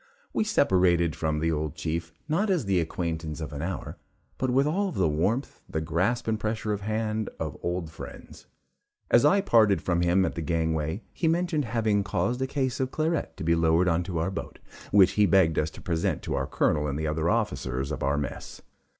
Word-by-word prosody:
We - - +2
separated 90 - +3
from 80 -1 -1
the 80 +2 +1
old 75 -2 -2
chief, 80 +1 -3 0.2
not 185 +7 +1
as 180 - +1
the 95 -2 +2
acquaintance 80 -2 -3
of 75 -2 -5
an 70 - -5
hour, 90 +3 -4 0.4
but 130 - 0
with 135 +3 +3
all 190 +6 0
the 95 - +1
warmth 95 - -1
the 80 - -2
grasp 90 +11 0
and 110 -1 0
pressure 110 -1 -2
of 105 - -4
hand 110 +1 -2
of 80 -3 -3
old 85 -2 -3
friends. - - -11 0.6
As 120 - +6
I 195 +7 +5
parted 110 - +4
from 85 -2 0
him 90 +2 +3
at 85 - -2
the 85 - -4
gangway, 80 +3 -1
he 165 - -1
mentioned 165 -3 +1
having 110 -3 +1
caused 100 +5 -1
a 130 - 0
case 130 -2 -1
of 130 -1 0
claret 160 +3 -1
to - - -5
be 85 +1 +3
lowered 80 +2 +3
into 85 +1 0
our 85 +4 0
boat, - - -6 0.3
which 100 -3 +6
he 105 -1 +3
begged 85 -3 +4
us 75 - 0
to - - -12
present 85 -2 -1
to - - -3
our - - -1
Colonel 75 -1 +1
and 70 -1 -2
the 80 - -2
other 80 +2 0
officers 70 - -1
of - - -4
our 70 +2 +1
mess. 75 - -5
90 Hz, 205 wpm, -27 LUFS, 80-115 Hz, 0.6 s, As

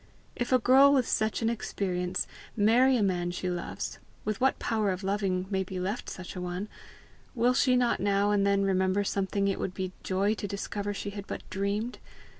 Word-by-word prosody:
If 245 +1 -3
a 255 - +7
girl 265 +4 +6
with 260 -4 +3
such 220 +1 0
an 225 - +3
experience 180 -5 -2 0.3
marry 245 +5 +5
a 215 - +2
man 175 -3 0
she 180 +1 -3
loves 175 -1 -4 0.3
with 215 +1 -2
what 265 +1 +3
power 220 -3 0
of 185 +1 -2
loving 190 -2 0
may 190 -1 +1
be 185 0 -6
left 200 +6 -3
such 185 0 -8
a 180 - -4
one 180 +3 -4 0.7
will 245 +1 +3
she 255 0 +3
not 245 -1 +2
now 200 +1 +2
and 205 -1 +3
then 200 0 +3
remember 190 +1 +2
something 200 0 0
it 195 - -1
would 185 - -3
be 185 -1 -3
joy 195 +3 +1
to 210 -1 -4
discover 200 +1 -3
she 205 - -4
had 200 0 -7
but - - -6
dreamed? 200 +5 -2
200 Hz, 200 wpm, -29 LUFS, 190-220 Hz, 0.7 s, a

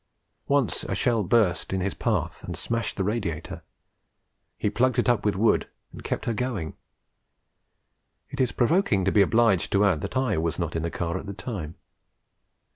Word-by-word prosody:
Once 140 - +1
a - - -2
shell 115 -3 +2
burst 90 -4 +2
in 95 - 0
his 95 +1 -1
path - - -2
and - - -5
smashed 115 0 -2
the 95 - 0
radiator; 100 -7 -3 1.0
he - - -1
plugged 130 0 +1
it 120 - +2
up 120 -4 +2
with 105 -2 +1
wood 110 +4 +2 0.2
and - - -11
kept - - -3
her 115 - 0
going. 110 -9 -3 1.6
It 135 - -2
is 125 - +2
provoking 120 - +2
to 95 - +2
be 105 - +5
obliged 110 -2 +3
to 100 +1 +4
add 90 -7 +2
that - - -3
I 125 -10 +1
was 80 0 -1
not 85 -2 -3
in 80 - 0
the 85 - -2
car 85 +2 -3
at 100 - -9
the 100 - -6
time. 95 -7 -5
100 Hz, 185 wpm, -26 LUFS, 90-120 Hz, 1.6 s, be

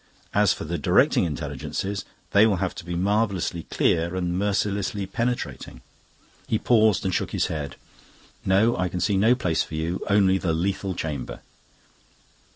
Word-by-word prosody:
As - - +4
for - - -3
the - - -3
Directing - - +3
Intelligences, 80 +6 -4 0.3
they 100 +2 +6
will 105 - +2
have 95 0 -2
to 95 - -8
be 85 +1 -4
marvellously 95 -3 0
clear 85 +2 +1
and 90 -1 -1
merciless 100 +1 0
and 100 -1 -5
penetrating." 120 +1 -3 0.7
He 110 - +1
paused 110 -5 +3
and 95 - 0
shook - - -1
his - - +1
head. 70 -4 -5 0.7
"No, 100 +5 +3
I 90 0 -1
can 90 - -4
see 100 +3 +1
no 110 +6 +4
place 90 -10 0
for 80 - -5
you; 80 +3 -2
only 95 -2 +4
the 85 -4 0
lethal 95 +2 -1
chamber." 75 -7 -4
95 Hz, 165 wpm, -25 LUFS, 85-100 Hz, 0.7 s, they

